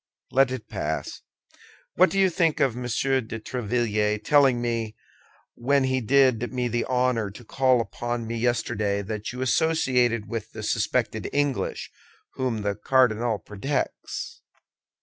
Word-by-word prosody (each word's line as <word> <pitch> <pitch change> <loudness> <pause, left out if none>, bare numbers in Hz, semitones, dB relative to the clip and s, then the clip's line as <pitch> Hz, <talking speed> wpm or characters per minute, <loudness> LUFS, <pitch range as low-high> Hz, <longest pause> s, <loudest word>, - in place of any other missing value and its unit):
"Let 135 0 +4
it 125 -4 -5
pass. 80 -7 -4 0.7
What 185 +2 +5
do 195 - -3
you 190 -1 +4
think 165 -3 +1
of 130 -4 +2
Monsieur 125 +2 0
de 115 -1 -7
Tréville 110 -3 -1
telling 140 -4 +4
me, 115 -2 -2 0.6
when 140 +3 +1
he 130 0 0
did 125 -1 +3
me 125 -1 -1
the 120 0 -1
honor 125 -4 +1
to 105 +5 -12
call 130 +1 +3
upon 120 0 -3
me 115 +1 -4
yesterday, 110 -4 0
that 105 +1 -4
you 125 +1 -4
associated 125 -6 +2
with 110 -1 -5
the - - -7
suspected - - -1
English, 145 -2 -1 0.4
whom 125 -5 -2
the 100 0 0
cardinal 120 0 +2
protects?" 130 +8 -4
120 Hz, 140 wpm, -25 LUFS, 110-130 Hz, 0.7 s, What